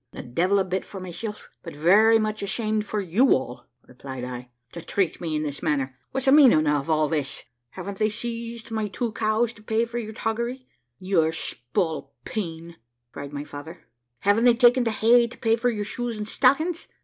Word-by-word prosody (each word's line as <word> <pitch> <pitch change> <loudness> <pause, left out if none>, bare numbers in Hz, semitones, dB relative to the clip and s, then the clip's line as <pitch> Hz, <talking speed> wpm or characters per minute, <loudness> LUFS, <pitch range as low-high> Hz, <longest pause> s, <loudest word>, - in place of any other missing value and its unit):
`The 120 - -9
devil 185 +7 +2
a 195 - +3
bit 185 0 -2
for 195 - -9
myself, 185 +4 -7
but 165 - -9
very 205 +9 +5
much 215 0 -2
ashamed 215 +1 -1
for 210 0 -1
you 200 +9 +4
all,' 125 -1 -5 0.2
replied 130 0 -8
I, 125 0 -6 0.2
`to 170 - -7
treat 190 -4 -1
me 160 -3 -2
in 150 - -1
this 145 -2 -5
manner. 135 -3 -1
What's 265 0 -3
the 265 - +5
meaning 260 - +7
of 145 0 0
all 155 -1 +3
this?' 145 -2 -2 0.3
`Haven't 200 -1 -6
they 215 - +3
seized 230 +1 -6
my 220 -1 -1
two 230 +3 -3
cows 220 +2 0
to 210 - -17
pay 220 +2 0
for 235 +1 -4
your 220 -1 -6
toggery, 235 +4 -3 0.3
you 185 +2 0
spalpeen?' 165 - -4 0.3
cried 140 0 -8
my 145 0 -5
father. 150 +3 -10 0.4
`Haven't 205 +4 +4
they 240 -1 +6
taken 245 +1 +5
the - - +2
hay 235 +2 +4
to 235 - -13
pay 225 -1 +2
for 240 +2 +1
your 210 -3 -3
shoes 240 +1 -4
and 210 0 -4
stockings?' 310 +9 +2
210 Hz, 195 wpm, -25 LUFS, 160-230 Hz, 0.4 s, meaning